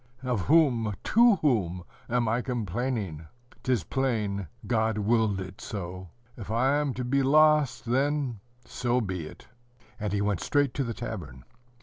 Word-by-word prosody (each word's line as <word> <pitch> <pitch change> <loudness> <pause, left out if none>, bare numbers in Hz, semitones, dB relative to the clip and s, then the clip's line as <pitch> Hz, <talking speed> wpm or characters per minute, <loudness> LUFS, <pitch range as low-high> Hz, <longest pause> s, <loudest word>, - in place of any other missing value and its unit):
Of 125 -6 0
whom, 125 -10 +3
to 235 -1 +5
whom, 100 - 0 0.3
am 120 -1 +1
I 115 +3 +1
complaining? 110 - -3 0.3
'T 130 - -1
is 115 -9 +2
plain, 105 - -1 0.2
God 110 -1 +1
willed 105 -1 +2
it 95 0 -8
so. 95 -3 -6 0.3
If 105 -4 -9
I 130 +5 +2
am 145 -3 -1
to 125 - -3
be 140 +3 +2
lost, 150 0 +4
then 135 -1 0 0.3
so 125 0 0
be 95 -8 -3
it!" - - -14 0.5
and 105 -2 -2
he 100 - 0
went 100 -3 0
straight 145 -3 +1
to 140 - -1
the 115 -3 -4
tavern. 90 - -7
115 Hz, 155 wpm, -27 LUFS, 100-130 Hz, 0.5 s, to